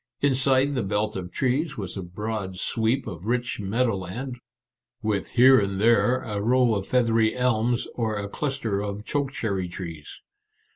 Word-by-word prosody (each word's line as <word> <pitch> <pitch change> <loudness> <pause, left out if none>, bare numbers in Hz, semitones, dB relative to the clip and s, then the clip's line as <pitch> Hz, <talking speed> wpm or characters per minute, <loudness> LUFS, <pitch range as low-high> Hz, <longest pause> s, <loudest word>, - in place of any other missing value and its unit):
Inside 135 0 +3
the 130 - 0
belt 105 +2 -1
of 90 -2 -5
trees 135 +4 0
was 95 -4 -4
a 95 - -4
broad 95 +1 -4
sweep 115 +7 0
of 90 +3 -7
rich 120 0 -1
meadow 110 +2 0
land, 120 +8 -6 0.6
with 105 -2 -1
here 130 +2 +7
and 100 -1 -2
there 120 +3 +4
a 105 -2 -3
row 125 +1 +3
of 100 -2 -2
feathery 115 -3 +2
elms 120 -1 +1
or 110 -3 -1
a 100 -1 -3
cluster 115 -5 -2
of 105 +1 -5
choke 140 -2 -1
cherry 100 -8 -2
trees. 85 -5 -8
110 Hz, 160 wpm, -25 LUFS, 100-125 Hz, 0.6 s, here